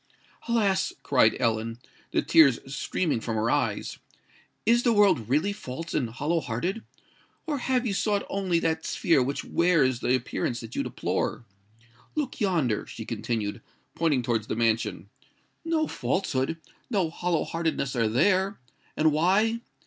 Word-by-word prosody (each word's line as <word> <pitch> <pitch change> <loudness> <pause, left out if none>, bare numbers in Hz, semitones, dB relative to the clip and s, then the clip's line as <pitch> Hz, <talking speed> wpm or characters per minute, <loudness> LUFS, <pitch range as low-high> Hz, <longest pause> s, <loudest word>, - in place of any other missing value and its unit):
"Alas!" 215 -5 +1
cried 125 -5 +4
Ellen, 115 -1 0 0.3
the - - 0
tears 140 -7 +6 0.2
streaming 155 -6 -1
from 115 0 -3
her 110 +2 +1
eyes: - - -1 0.7
"is 235 +2 +4
the 240 -2 +3
world 195 - +3
really 155 +10 +2
false 165 -3 -7
and 125 -5 0
hollow 145 +8 -1
hearted? 175 - -3 0.6
or 300 -4 -2
have 255 0 0
you 215 - 0
sought 205 0 0
only 190 -3 0
that 160 -1 0
sphere 160 -5 +2
which 135 +3 -2
wears 150 -8 +2
the 125 0 +2
appearance 120 -1 -2
that 115 0 -9
you - - 0
deplore? 115 - -2 0.7
Look 280 -5 -3
yonder," 160 - +1
she - - -8
continued, 110 -2 -3 0.3
pointing 150 -7 +1
towards 115 -3 -1
the - - -2
mansion; 115 -1 0 0.5
"no 325 -1 +1
falsehood—no 165 - -2
hollow 175 -1 0
heartedness 160 -5 -2
are 115 -2 +2
there! 190 - +2 0.4
And 155 0 +4
why? 195 +9 +2
160 Hz, 140 wpm, -27 LUFS, 120-200 Hz, 0.7 s, tears